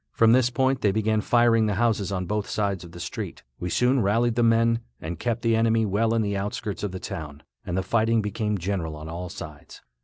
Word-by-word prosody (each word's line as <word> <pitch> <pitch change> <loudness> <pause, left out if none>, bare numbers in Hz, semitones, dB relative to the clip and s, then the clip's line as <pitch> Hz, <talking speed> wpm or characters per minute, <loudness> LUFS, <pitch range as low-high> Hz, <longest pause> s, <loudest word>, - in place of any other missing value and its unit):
From 115 0 +5
this 125 0 +4
point 130 +1 +1
they 100 - +3
began 110 +1 +1
firing 115 -1 +3
the 105 - 0
houses 105 -2 +1
on 90 -1 -2
both 105 +3 -2
sides 100 -3 -1
of 85 - -11
the 85 - -10
street. - - -6 0.2
We 90 - -3
soon 125 +6 +2
rallied 115 +4 +2
the 120 - +1
men, 115 0 +3 0.2
and 80 +1 -6
kept 120 -1 -2
the 115 -1 +3
enemy 115 0 +3
well 110 +3 +1
in 115 - +2
the 100 -1 -1
outskirts 100 0 -3
of 105 - -2
the 95 - -6
town, 75 -7 -7 0.2
and 90 - -3
the 95 - 0
fighting 115 +1 +2
became 105 0 -1
general 90 -4 -3
on 75 +1 -8
all 85 +2 -5
sides. - - -10
105 Hz, 225 wpm, -25 LUFS, 95-115 Hz, 0.2 s, From